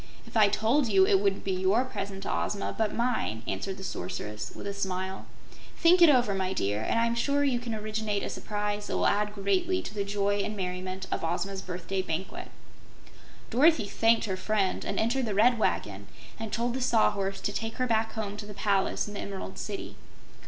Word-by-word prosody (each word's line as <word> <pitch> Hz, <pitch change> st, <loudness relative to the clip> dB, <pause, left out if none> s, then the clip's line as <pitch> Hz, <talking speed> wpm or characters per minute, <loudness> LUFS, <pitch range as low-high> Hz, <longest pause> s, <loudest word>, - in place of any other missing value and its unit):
"If -, -, -15 dB
I 215 Hz, -2 st, +7 dB
told 230 Hz, +7 st, +2 dB
you, 190 Hz, -2 st, +6 dB
it 195 Hz, -, +4 dB
wouldn't 195 Hz, -1 st, 0 dB
be 195 Hz, -, -1 dB
YOUR 190 Hz, +7 st, +2 dB
present 195 Hz, -6 st, -5 dB
to -, -, -1 dB
Ozma, 205 Hz, -, -2 dB
but 220 Hz, -2 st, 0 dB
MINE," 230 Hz, -, -1 dB
answered 195 Hz, -1 st, -3 dB
the 190 Hz, -, -8 dB
Sorceress, 105 Hz, -, -5 dB
with -, -, -8 dB
a 200 Hz, -, -3 dB
smile. 190 Hz, -1 st, -3 dB, 0.5 s
"Think 350 Hz, +1 st, +5 dB
it 340 Hz, -, +9 dB
over, 245 Hz, -7 st, +4 dB
my 190 Hz, -1 st, -1 dB
dear, 105 Hz, -, -1 dB
and 170 Hz, -, 0 dB
I 230 Hz, -, +3 dB
am 230 Hz, -, +1 dB
sure 280 Hz, +4 st, +1 dB
you 265 Hz, -4 st, +2 dB
can 235 Hz, -2 st, -4 dB
originate 215 Hz, -1 st, -2 dB
a -, -, -3 dB
surprise 210 Hz, 0 st, -3 dB
that -, -, -1 dB
will -, -, +1 dB
add 210 Hz, +1 st, +2 dB
greatly 200 Hz, -, +1 dB
to -, -, -7 dB
the 205 Hz, -1 st, -1 dB
joy 200 Hz, 0 st, 0 dB
and 210 Hz, +1 st, -2 dB
merriment 185 Hz, 0 st, -4 dB
of -, -, -1 dB
Ozma's 190 Hz, +4 st, -2 dB
birthday 185 Hz, +1 st, -3 dB
banquet." 185 Hz, +1 st, -4 dB, 1.0 s
Dorothy 275 Hz, 0 st, +5 dB
thanked 225 Hz, +3 st, +3 dB
her 190 Hz, -3 st, -1 dB
friend 200 Hz, -1 st, 0 dB
and -, -, -2 dB
entered 240 Hz, +2 st, +1 dB
the 205 Hz, -, -2 dB
Red 235 Hz, +3 st, +5 dB
Wagon 100 Hz, -, -1 dB, 0.3 s
and 220 Hz, -1 st, -5 dB
told 235 Hz, +1 st, 0 dB
the 260 Hz, -, -3 dB
Sawhorse 200 Hz, -5 st, +2 dB
to 205 Hz, -, -2 dB
take 225 Hz, +1 st, -3 dB
her 255 Hz, -, 0 dB
back 220 Hz, -2 st, +1 dB
home 205 Hz, -2 st, -4 dB
to 205 Hz, 0 st, -7 dB
the 210 Hz, -, -9 dB
palace 200 Hz, -1 st, +1 dB
in 205 Hz, -, -7 dB
the 205 Hz, -, -5 dB
Emerald 195 Hz, -1 st, -6 dB
City. 205 Hz, -2 st, -5 dB
205 Hz, 210 wpm, -28 LUFS, 190-225 Hz, 1.0 s, it